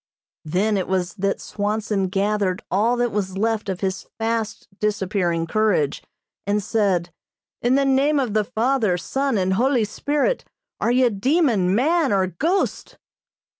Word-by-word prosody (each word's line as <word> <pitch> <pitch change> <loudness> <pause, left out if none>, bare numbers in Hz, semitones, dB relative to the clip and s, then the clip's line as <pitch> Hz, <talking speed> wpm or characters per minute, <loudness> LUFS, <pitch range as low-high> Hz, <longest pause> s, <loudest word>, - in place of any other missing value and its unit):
Then 195 +7 +1
it 190 - -2
was 185 -1 -1
that 200 -1 -1
Swanson 205 -1 -2
gathered 195 -1 0
all 225 +6 +2
that 240 -1 +1
was 190 -2 -2
left 220 0 0
of 185 -2 -3
his 190 -1 -3
fast 225 -1 -2
disappearing 190 -5 0
courage, 190 -6 +1 0.5
and 205 0 +1
said: 190 -5 0 0.5
"In 245 +2 +3
the 275 0 +3
name 275 +2 +3
of 250 -6 -1
the 215 -1 +2
Father, 220 -3 +1
Son 270 +6 -1
and 190 0 +1
Holy 245 +2 +2
Spirit, 290 - -1 0.4
are 235 - +1
you 250 -1 +3
demon, 215 - +2
man 310 +4 +2
or 195 -2 +3
ghost?" 320 - -1
210 Hz, 145 wpm, -22 LUFS, 190-245 Hz, 0.5 s, In